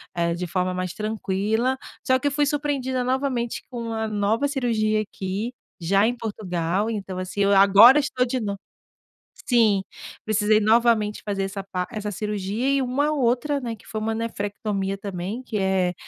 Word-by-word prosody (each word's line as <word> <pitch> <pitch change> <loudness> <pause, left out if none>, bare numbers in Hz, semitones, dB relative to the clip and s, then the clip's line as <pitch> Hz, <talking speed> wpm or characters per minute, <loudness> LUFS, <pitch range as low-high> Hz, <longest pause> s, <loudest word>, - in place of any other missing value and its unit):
eh, 170 0 +1
de 180 0 -4
forma 185 +1 -1
mais 185 -1 -3
tranquila, 215 +4 -1 0.2
só 260 0 +3
que 290 - -1
eu 285 - +1
fui 290 +1 +2
surpreendida 275 -3 -1
novamente 255 -2 -1
com 235 -2 -5
uma 220 -1 -2
nova 215 +5 +1
cirurgia 225 -6 0
aqui, 205 +4 -4 0.3
já 195 +5 +3
em 245 - -1
Portugal, 195 -3 -2
então 195 -4 -4
assim 185 +2 -3
eu 200 0 +4
agora 200 +8 +8
estou 260 -3 0
de 255 +1 -2
nov 200 -3 -3 0.9
sim, 220 -6 +4 0.4
precisei 215 0 +2
novamente 220 -1 +3
fazer 200 -2 -1
essa 195 +1 -4
pa 180 -2 -3
essa 215 -3 -5
par - - -5
cirurgia 210 +4 -2
e 275 -1 +2
uma 275 +4 0
outra, 275 +1 +1
né, 235 -3 -4
que - - -21
foi 215 - -5
um 215 - -4
nefrectomia 205 -3 -3
também 195 +4 -5
que 220 -4 -4
é 190 -2 +1
215 Hz, 170 wpm, -24 LUFS, 195-245 Hz, 0.9 s, agora